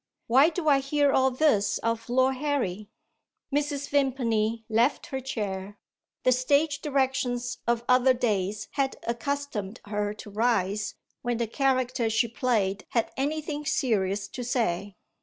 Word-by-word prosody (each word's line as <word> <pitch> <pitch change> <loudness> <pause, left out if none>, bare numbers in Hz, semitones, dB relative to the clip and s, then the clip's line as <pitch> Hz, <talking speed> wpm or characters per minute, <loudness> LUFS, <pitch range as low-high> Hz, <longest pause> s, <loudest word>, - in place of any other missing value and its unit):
"Why 270 +7 +5
do 345 -1 -4
I 280 -2 +6
hear 285 +1 +2
all 265 0 +4
this 255 -6 +2
of 230 +1 -2
Lord 260 +1 +2
Harry?" 240 -9 -2 0.6
Mrs. 290 -1 -1
Vimpany 230 -5 0
left 235 +5 +2
her 265 - 0
chair. 205 -6 -4 0.5
The 255 - +4
stage 285 +4 +2
directions 260 -3 -1
of 235 0 +1
other 255 +1 +5
days 210 -3 -1
had 275 -2 -1
accustomed 235 -4 -3
her 205 0 -2
to 210 - -10
rise, 210 -2 0 0.3
when 240 -1 -1
the 235 - 0
character 255 -1 +1
she 225 +2 +2
played 215 -5 0
had 230 - 0
anything 300 +2 -2
serious 200 -8 0
to 250 - -6
say. 205 -6 -1
245 Hz, 140 wpm, -27 LUFS, 215-275 Hz, 0.6 s, I